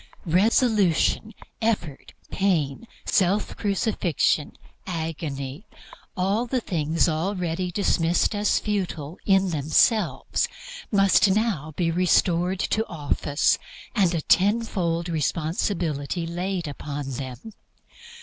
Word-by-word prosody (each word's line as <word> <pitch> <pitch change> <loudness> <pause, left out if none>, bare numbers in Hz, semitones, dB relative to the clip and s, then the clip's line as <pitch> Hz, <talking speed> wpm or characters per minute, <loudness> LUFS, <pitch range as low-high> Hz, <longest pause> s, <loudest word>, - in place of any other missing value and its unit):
Resolution, 210 +2 +2 0.3
effort, 200 -11 -2 0.2
pain, 175 -2 0 0.2
self 195 +2 +1
crucifixion, 195 - 0 0.3
agony 160 -2 -4 0.5
all 200 +6 +1
the 255 +1 0
things 165 -5 0
already 175 +1 -1
dismissed 175 -1 +1
as 205 0 +2
futile 180 -6 -3
in 195 -2 +3
themselves, 155 - +2 0.4
must 195 -1 +5
now 190 -7 0
be 170 -2 +1
restored 180 +1 +2
to 220 - +1
office, 145 -2 0 0.4
and 185 -5 +3
a 165 - -1
tenfold 185 -4 +1
responsibility 165 0 -1
laid 175 +1 -3
upon 145 -1 -5
them. 130 - -7
175 Hz, 90 wpm, -24 LUFS, 155-200 Hz, 0.5 s, must